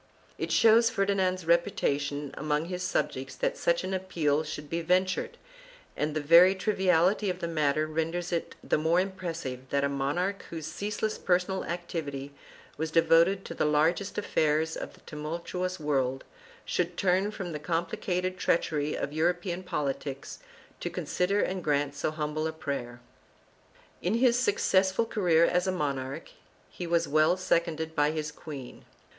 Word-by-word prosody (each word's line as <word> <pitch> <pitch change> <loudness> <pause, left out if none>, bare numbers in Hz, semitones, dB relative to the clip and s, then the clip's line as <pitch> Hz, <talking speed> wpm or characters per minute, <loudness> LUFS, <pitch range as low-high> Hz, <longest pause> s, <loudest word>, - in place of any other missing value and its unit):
1 - - -1
It - - -7
shows 230 +1 +6
Ferdinand's 195 -5 0
reputation 145 -4 0
among 150 +1 -1
his 180 +1 -4
subjects 130 -7 -2
that - - -1
such 170 +1 +1
an 185 +1 -3
appeal 165 -6 0
should 150 -1 -6
be 165 +3 -2
ventured, 185 +2 +1 0.6
and 150 0 -2
the - - +1
very 170 +6 +7
triviality 190 0 +2
of 180 - -2
the 170 - -3
matter 155 -2 +1
renders 165 +3 -2
it 170 -1 -2
the - - +1
more 160 +3 +3
impressive 165 -9 -4
that 140 0 +1
a 140 - +2
monarch, 155 +9 -1
whose 160 -2 -6
ceaseless 210 +6 -3
personal 185 +1 +1
activity 150 -5 -4 0.4
was 160 +1 -2
devoted 165 +4 +4
to - - -6
the - - -1
largest 160 +6 +1
affairs 160 -5 +1
of - - -7
that - - -23
tumultuous 170 +4 -4
world, 135 -3 0 0.4
should 175 -1 -1
turn 190 +1 +2
from 190 -4 -5
the 150 - -4
complicated 175 +3 -2
treachery 150 -3 +1
of 145 - -3
European 175 +3 0
politics 140 -5 -4 0.4
to - - -3
consider 195 +3 0
and 185 -1 -2
grant 145 -1 +1
so 145 - -1
humble 155 0 -2
a - - -2
prayer. 140 -6 -5 1.0
In 185 +5 0
his 245 0 +4
successful 195 -2 +2
career 175 -7 +3
as 180 +2 +1
a - - +2
monarch 140 -3 -3 0.4
he 175 - -6
was 170 -1 +2
well 155 +4 +3
seconded 165 -3 0
by 145 -1 +3
his 155 -1 -3
queen. 145 -4 -9
165 Hz, 155 wpm, -29 LUFS, 150-185 Hz, 1.0 s, very